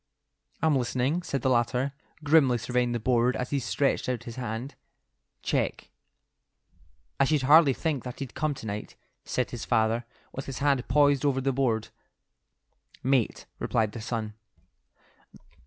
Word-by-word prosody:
"I'm 160 -2 +4
listening," 130 +6 0
said 140 -7 -3
the 130 - +3
latter, 125 +3 +1 0.3
grimly 145 -5 +4
surveying 125 +1 0
the 120 - -1
board 125 +2 +2
as 125 - -3
he 140 - +1
stretched 135 +2 0
out 120 -2 -2
his 115 -1 -8
hand. 120 +2 -4 0.7
"Check." - - -1 1.3
"I 140 - +5
should 150 -1 +1
hardly 145 +1 +7
think 150 -3 -2
that 125 -1 -7
he'd 135 -3 -6
come 155 -2 -1
to 115 - -9
night," 105 0 -5 0.3
said - - -1
his - - -5
father, 115 +1 +1 0.3
with 135 - -6
his 135 - -5
hand 140 -3 +1
poised 145 -2 +4
over 140 -2 +2
the 135 0 0
board. 120 -5 0 1.1
"Mate," 130 -3 +1
replied 110 -2 0
the 115 - -7
son. 110 -1 -3
130 Hz, 150 wpm, -27 LUFS, 120-140 Hz, 1.3 s, hardly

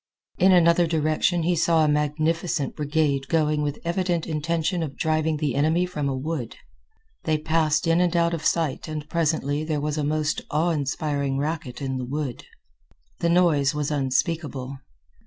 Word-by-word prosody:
In 190 +2 +5
another 170 -1 +5
direction 160 +2 +1
he 175 +2 +2
saw 160 -1 +3
a - - +2
magnificent 150 +1 0
brigade 145 -2 0
going 155 -2 +1
with 145 -1 -1
the - - -11
evident 175 -1 0
intention 165 +2 -1
of 145 -4 -5
driving 155 0 0
the 150 -2 -1
enemy 160 +5 +2
from 150 -6 -3
a 135 - -2
wood. 140 -4 -4 0.7
They 155 -1 +2
passed 155 0 +1
in 165 +1 +3 0.2
out 170 0 +2
of 165 -2 -3
sight 160 -5 0
and 155 -1 -5
presently 155 -3 0
there 155 -1 -1
was 150 +1 -2
a - - 0
most 155 +1 0
awe 160 +4 +1
inspiring 140 -2 -1
racket 145 -3 -3
in 130 -1 -2
the 125 - -3
wood. 140 -1 -4 0.7
The 170 - +1
noise 160 -6 +3
was 150 0 -2
unspeakable. 140 -1 -1
155 Hz, 165 wpm, -24 LUFS, 145-165 Hz, 0.7 s, In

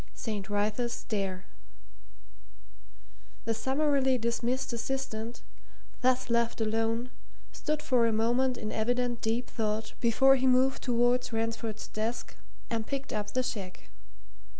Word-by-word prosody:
ST. 210 -4 -4
WRYTHA'S 210 +4 0
STAIR 195 -5 -3 2.0
The 230 - +1
summarily 265 +2 +2
dismissed 235 +2 -1
assistant, 235 -2 -3 0.6
thus 255 -1 +2
left 235 0 +2
alone, 225 +2 0 0.4
stood 305 0 -2
for 245 -3 +3
a - - +2
moment 240 +3 +2
in 215 -2 -4
evident 245 +1 0
deep 230 +2 0
thought 215 -1 -2
before 265 +3 +5
he 260 0 +2
moved 260 +1 +4
towards 245 0 +2
Ransford's 225 -1 -2
desk 220 +3 -3 0.3
and 225 -1 -2
picked 275 -1 -3
up 210 -1 -2
the 255 - +2
cheque. 195 -7 -5
235 Hz, 120 wpm, -30 LUFS, 220-255 Hz, 2.0 s, before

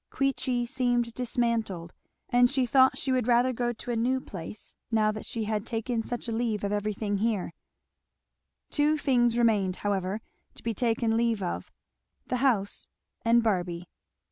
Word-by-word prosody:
Queechy 260 -3 0
seemed 240 -2 0
dismantled, 230 -8 -1 0.3
and 245 -1 +4
she 265 -1 +1
thought 260 +2 +5
she 265 - -1
would 255 -3 +1
rather 245 +1 +4
go 240 0 0
to 240 +1 -6
a - - 0
new 250 +3 +1
place 195 -3 -9
now 215 -2 +3
that 215 0 -7
she 230 - -3
had 215 -1 -1
taken 230 +1 -2
such 240 +1 -5
a - - -2
leave 225 -3 -1
of 200 - -1
every 210 +1 0
thing 205 -1 -2
here. 210 -6 0 1.2
Two 300 +1 +3
things 240 -5 +2
remained 210 -6 +2
however 195 0 0 0.4
to - - -12
be 230 - -1
taken 225 0 +1
leave 230 -3 +1
of; 175 - -4 0.5
the 250 - -1
house 235 -7 +1 0.4
and 235 0 +4
Barby. 175 -5 -1
230 Hz, 165 wpm, -28 LUFS, 210-245 Hz, 1.2 s, thought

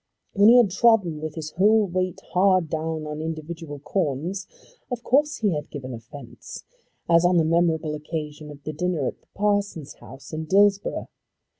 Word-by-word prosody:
When 205 +1 +6
he 240 - +8
had 230 -6 +5
trodden 190 -7 +3
with 155 -1 -5
his 155 -2 -6
whole 210 +4 +4
weight 185 -1 -2
hard 185 -3 +3
down 160 0 -3
on 150 0 -5
individual 160 -1 -6
corns, 165 +4 -2 0.4
of 245 -2 -4
course 295 +3 +2
he 210 -3 +1
had 150 0 -4
given 130 -4 -7
offence, 120 +2 -10 0.4
as 170 0 +5
on 175 0 +4
the 165 - +3
memorable 160 -2 +1
occasion 150 0 -6
of 145 -1 -12
the 155 - -5
dinner 165 -2 -1
at - - -4
the - - -35
parson's 205 -7 -1
house 135 +2 -12
in 160 0 -4
Dillsborough. 200 +3 +2
165 Hz, 170 wpm, -24 LUFS, 150-195 Hz, 0.4 s, he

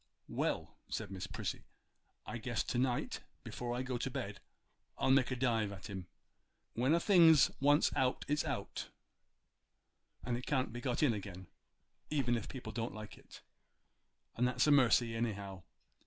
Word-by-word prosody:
'Well,' - - -2
said - - -4
Miss 95 -2 -5
Prissy, - - -4 0.6
'I - - -5
guess - - -1
to 120 - -1
night 125 -1 0 0.2
before 120 0 -4
I 125 - -2
go 125 -1 -3
to 135 - -2
bed 120 -7 -5 0.6
I'll 130 - +2
make 130 -1 +4
a 125 - -1
dive 115 -5 +1
at 100 0 -8
him. 95 -3 -6 0.7
When 130 +7 +3
a - - +3
thing's 165 -5 +6
once 145 +2 +4
out 130 -1 +1
it's 150 +1 +1
out, - - -4 1.3
and 120 0 -2
can't 130 -5 0
be 120 - -5
got 125 +2 0
in 135 -6 +4
again, 95 -3 -7 0.6
even 130 -5 +1
if 115 - -4
people 125 -4 -6
don't 115 0 -3
like 110 0 -8
it, - - -15 0.9
and 125 +1 +2
that's 125 0 +2
a 150 - +4
mercy 120 -4 +5
anyhow. 100 -5 -3
120 Hz, 160 wpm, -35 LUFS, 110-130 Hz, 1.3 s, thing's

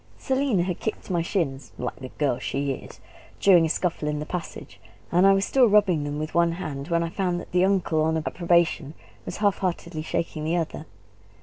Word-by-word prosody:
Selina 265 -8 +1
had 180 -1 -3
kicked 220 -2 -4
my 175 -2 +1
shins 140 - -2
like 125 - -4
the 130 -1 -8
girl 140 -5 +1
she 140 +2 -2
is! - - -11 0.4
during 175 -4 +6
a - - -5
scuffle 165 -2 -1
in 150 0 -1
the 150 - -4
passage, 175 +1 -7 0.3
and 180 +3 +5
I 195 - +7
was 195 0 +2
still 260 -3 +4
rubbing 195 -8 +3
them 145 0 -3
with 155 +1 -4
one 170 0 +3
hand 145 -5 -5
when 170 -1 +1
I 165 - -2
found 180 -1 -1
that - - -10
the 180 0 +3
uncle 185 -5 +1
on 160 +1 +1
approbation 170 -2 +1 0.3
was - - -4
half 205 -2 +1
heartedly 170 -3 -3
shaking 155 0 -3
the 165 +3 0
other. 165 -2 -4
170 Hz, 205 wpm, -25 LUFS, 155-185 Hz, 0.4 s, I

